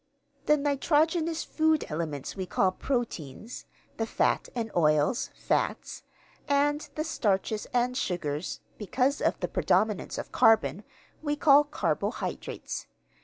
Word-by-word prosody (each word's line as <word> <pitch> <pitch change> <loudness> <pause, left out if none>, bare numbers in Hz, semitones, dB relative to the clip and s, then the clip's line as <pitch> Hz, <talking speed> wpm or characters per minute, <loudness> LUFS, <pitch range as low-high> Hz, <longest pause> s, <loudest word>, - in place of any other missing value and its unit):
The 300 - +5
nitrogenous 315 +3 +1
food 315 -1 +1
elements 150 -4 -4
we 190 -1 -4
call 185 +1 +2
proteins; 230 - -4 0.3
the 225 - -1
fats - - +1
and 225 -2 -2
oils, 155 - +2
fats; - - -1 0.5
and 290 +1 +1
the 310 - -1
starches 210 - -1
and 250 +1 +1
sugars 170 - -2 0.2
(because 255 +6 0
of - - +1
the - - 0
predominance 215 -3 +1
of - - -6
carbon), 220 -2 +4 0.4
we 295 -1 -1
call 290 -1 +6
carbohydrates. 290 - -3
240 Hz, 120 wpm, -28 LUFS, 185-290 Hz, 0.5 s, call